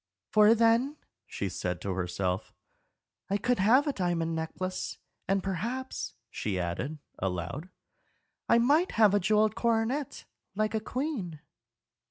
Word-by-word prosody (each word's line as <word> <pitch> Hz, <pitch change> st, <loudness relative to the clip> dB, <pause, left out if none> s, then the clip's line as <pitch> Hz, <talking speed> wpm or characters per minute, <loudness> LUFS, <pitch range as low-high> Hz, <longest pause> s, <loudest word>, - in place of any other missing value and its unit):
"For 215 Hz, +1 st, +7 dB
then," 235 Hz, +6 st, +3 dB, 0.3 s
she 100 Hz, -, -3 dB
said 90 Hz, -1 st, -3 dB
to 100 Hz, -, -2 dB
herself, 90 Hz, +1 st, -2 dB, 0.7 s
"I 200 Hz, -, +2 dB
could 245 Hz, +2 st, +1 dB
have 240 Hz, +9 st, +5 dB
a 290 Hz, -, 0 dB
diamond 170 Hz, -4 st, 0 dB
necklace; 185 Hz, +3 st, -3 dB, 0.3 s
and 195 Hz, 0 st, +1 dB
perhaps," 235 Hz, +8 st, -3 dB, 0.2 s
she 100 Hz, -3 st, -2 dB
added, 90 Hz, -, -3 dB, 0.2 s
aloud, 95 Hz, -, -3 dB, 0.8 s
"I -, -, +6 dB
might 290 Hz, +10 st, +3 dB
have 215 Hz, -3 st, +5 dB
a 205 Hz, -, +4 dB
jewelled 215 Hz, +3 st, +3 dB
coronet, 235 Hz, +5 st, 0 dB, 0.3 s
like 215 Hz, +1 st, 0 dB
a 220 Hz, -, +1 dB
queen." 220 Hz, -, -3 dB
200 Hz, 130 wpm, -29 LUFS, 155-235 Hz, 0.8 s, For